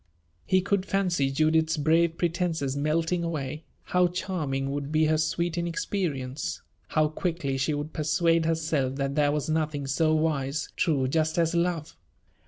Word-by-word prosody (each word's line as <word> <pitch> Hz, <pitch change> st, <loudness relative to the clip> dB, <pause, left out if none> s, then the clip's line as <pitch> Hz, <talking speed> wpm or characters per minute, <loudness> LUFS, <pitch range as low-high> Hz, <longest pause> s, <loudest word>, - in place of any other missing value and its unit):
He 185 Hz, -1 st, +4 dB
could 200 Hz, 0 st, 0 dB
fancy 175 Hz, -8 st, +1 dB
Judith's 155 Hz, +3 st, +2 dB
brave 165 Hz, +2 st, +2 dB
pretenses 165 Hz, -5 st, -1 dB
melting 165 Hz, +4 st, 0 dB
away; 155 Hz, -2 st, -4 dB, 0.2 s
how 180 Hz, 0 st, +3 dB
charming 155 Hz, -7 st, -2 dB
would 145 Hz, 0 st, -4 dB
be 155 Hz, 0 st, +3 dB
her 155 Hz, 0 st, +2 dB
sweet 170 Hz, +2 st, 0 dB
inexperience! 165 Hz, -6 st, -3 dB, 0.2 s
How 155 Hz, -1 st, +2 dB
quickly 155 Hz, -3 st, -2 dB
she 135 Hz, +3 st, 0 dB
would 145 Hz, +2 st, -5 dB
persuade 165 Hz, +2 st, +2 dB
herself 155 Hz, -5 st, 0 dB
that 140 Hz, 0 st, -1 dB
there 145 Hz, 0 st, +3 dB
was 150 Hz, -1 st, -1 dB
nothing 155 Hz, -2 st, -1 dB
so 155 Hz, +3 st, +2 dB
wise, 150 Hz, -2 st, -1 dB
true, 150 Hz, -9 st, +1 dB
just 155 Hz, +3 st, 0 dB
as 165 Hz, -1 st, +2 dB
love! 170 Hz, -, -1 dB
155 Hz, 150 wpm, -27 LUFS, 145-170 Hz, 0.2 s, He